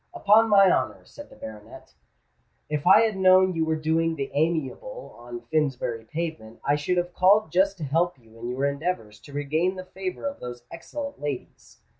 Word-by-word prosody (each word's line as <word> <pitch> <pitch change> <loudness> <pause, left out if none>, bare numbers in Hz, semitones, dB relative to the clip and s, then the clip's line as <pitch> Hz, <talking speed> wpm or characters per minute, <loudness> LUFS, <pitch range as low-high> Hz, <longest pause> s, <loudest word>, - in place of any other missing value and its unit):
"Upon 220 +2 +5
my 195 -3 +6
honour," - - -1
said 290 0 -12
the - - -15
baronet, 110 - -11 0.8
"if 150 +2 -2
I 195 +4 +8
had 220 -2 +1
known 185 0 +5
you 165 -1 0
were 160 0 0
doing 160 +1 0
the 140 -3 -4
amiable 165 - -2
on 120 0 -8
Finsbury 130 -7 -1
Pavement, 155 -7 -5
I 145 - +3
should 150 +5 -1
have 175 0 -1
called 190 -1 +4
just 195 +3 +2
to 165 - -6
help 165 +4 0
you 115 -2 -21
in 120 +1 -5
your 130 +3 -1
endeavours 140 -7 -3
to 145 - -15
regain 155 +6 0
the 185 0 -7
favour 190 +5 -6
of 280 0 -3
those 120 -1 -8
excellent 280 - -7
ladies." 145 -3 -7
160 Hz, 185 wpm, -25 LUFS, 140-185 Hz, 0.8 s, I